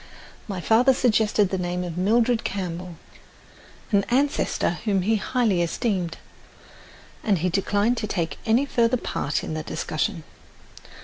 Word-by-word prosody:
My 195 -4 -4
father 245 - +4
suggested 215 -4 +2
the 190 - -2
name 180 0 -2
of 175 -2 -5
Mildred 225 +5 +2
Campbell, 180 -2 -4 1.0
an 200 -1 +4
ancestor 260 -8 +1
whom 195 -4 +1
he 220 +3 +2
highly 215 -5 +1
esteemed, 175 -1 -1 1.1
and 205 -4 +2
he 180 +3 0
declined 205 +5 +1
to 215 - -2
take 165 -7 -3
any 235 +4 +3
further 235 -2 +2
part 150 -9 -2
in - - -4
the 155 - -3
discussion. 160 +3 -3
200 Hz, 135 wpm, -24 LUFS, 180-230 Hz, 1.1 s, father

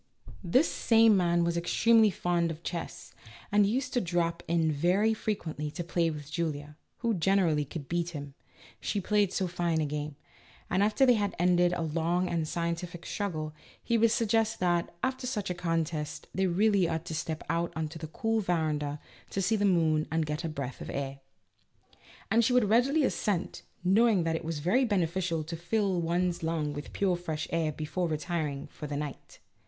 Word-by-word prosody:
This 255 - +3
same 225 -2 +4
man 175 -2 +2
was 170 0 0
extremely 220 +6 +4
fond 175 -2 0
of 165 +1 -7
chess, 170 -2 -6 0.4
and 205 0 +5
used 255 +5 -1
to 245 - +2
drop 170 -1 -1
in 165 -1 +2
very 180 +9 +2
frequently 165 -9 -3
to 175 +4 -5
play 170 -1 +1
with 150 -2 -7
Julia, 150 -3 -3 0.3
who 235 -1 +1
generally 175 -5 +2
could 145 0 -7
beat 170 0 -1
him 145 -4 -7 0.5
(she 205 - -1
played 205 0 +2
so 190 - 0
fine 170 -2 0
a 155 - +1
game), 150 0 -4 0.6
and 185 +2 +2
after 210 +6 +4
they 250 - +6
had 205 -3 0
ended 175 0 +3
a 170 - -1
long 165 +3 0
and 165 -3 -1
scien 170 +1 -1
tific 175 0 -8
struggle, 155 -7 -3 0.3
he 235 - +1
would 230 0 +5
suggest 225 0 +1
that, 175 -1 +1
after 260 -1 -1
such 210 -7 -2
a - - 0
contest, 165 -3 -2
they 190 +1 +1
really 195 0 +3
ought 160 +1 -2
to - - -5
step 160 0 -3
out 170 +2 0
on 160 -1 -1
to 165 +1 -9
the 160 - -5
cool 225 +7 -1
veranda 155 -6 -1 0.3
to - - -3
see 195 +4 +2
the 205 -1 +1
moon 160 -5 +2
and 160 -1 0
get 150 +3 -3
a 165 - -2
breath 140 -4 -5
of - - -6
air. 135 0 -4 1.1
And 230 +1 +5
she 245 - +2
would 245 -5 +3
readily 270 +7 +4
assent, 200 -8 -1 0.2
knowing 200 0 +4
that 165 0 0
it 165 - -3
was 160 -2 -3
very 250 +9 +4
beneficial 180 -6 0
to 165 +2 -5
fill 185 +1 0
one's 175 +1 0
lungs 160 -2 -1
with 145 - -7
pure 190 -3 +1
fresh 160 -3 -4
air 165 -2 +1
before 155 +4 -2
retiring 155 -2 -2
for 150 - -8
the 145 0 -3
night. 145 -2 -6
170 Hz, 190 wpm, -29 LUFS, 160-200 Hz, 1.1 s, they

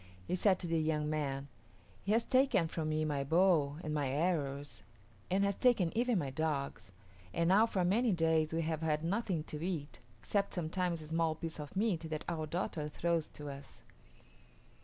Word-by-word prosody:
He - - -3
said 185 0 +4
to - - -6
the 165 -1 +1
young 155 -1 0
man, 140 -2 -2 0.5
"He 200 - -2
has 230 +1 +3
taken 260 -10 +3
from 160 -1 -3
me 155 0 0
my 145 -2 -1
bow 160 -2 +3
and 155 - -3
my 145 -3 0
arrows 145 - -1 0.5
and 195 +2 +2
has 200 -1 +1
taken 225 -9 +3
even 240 -1 +2
my 140 -6 -1
dogs; 140 -7 -2 0.4
and 170 0 +2
now 210 +5 +6
for 185 -5 0
many 225 +6 +3
days 160 -3 +2
we 165 0 0
have 160 0 -2
had 155 -1 0
nothing 185 -2 -1
to 155 0 -6
eat, 160 -5 -3 0.2
except 200 -1 -1
sometimes 175 -1 -1
a - - -10
small 165 -1 +1
piece 160 0 -6
of 150 +4 -7
meat 190 -6 0
that 155 -1 -4
our 160 -3 -2
daughter 155 -2 -2
throws 165 0 0
to 150 -1 -8
us." 140 0 -10
160 Hz, 185 wpm, -34 LUFS, 150-185 Hz, 0.5 s, now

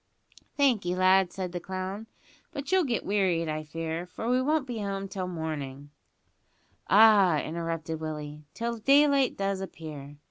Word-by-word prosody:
"Thankee, 225 -11 +2
lad," 185 0 +4
said 185 -2 -5
the 175 - -4
clown; 190 +4 -5 0.4
"but 280 +3 -6
you'll 375 -3 +4
git 240 -4 -2
wearied, 185 -5 +1
I 155 0 -3
fear, 165 +2 -4
for 225 - -6
we 250 +1 +2
won't 300 +1 +1
be 240 -4 -5
home 195 -1 -3
till 190 -1 -4
mornin' 145 -5 -5 0.5
" - - -41 0.2
"Ah!" 200 -5 +6
interrupted 165 -1 -4
Willie, 150 -1 -6
"till 235 0 -3
daylight 275 +2 +4
does 195 -1 -1
appear. 150 -6 -8
185 Hz, 150 wpm, -28 LUFS, 160-225 Hz, 0.5 s, Ah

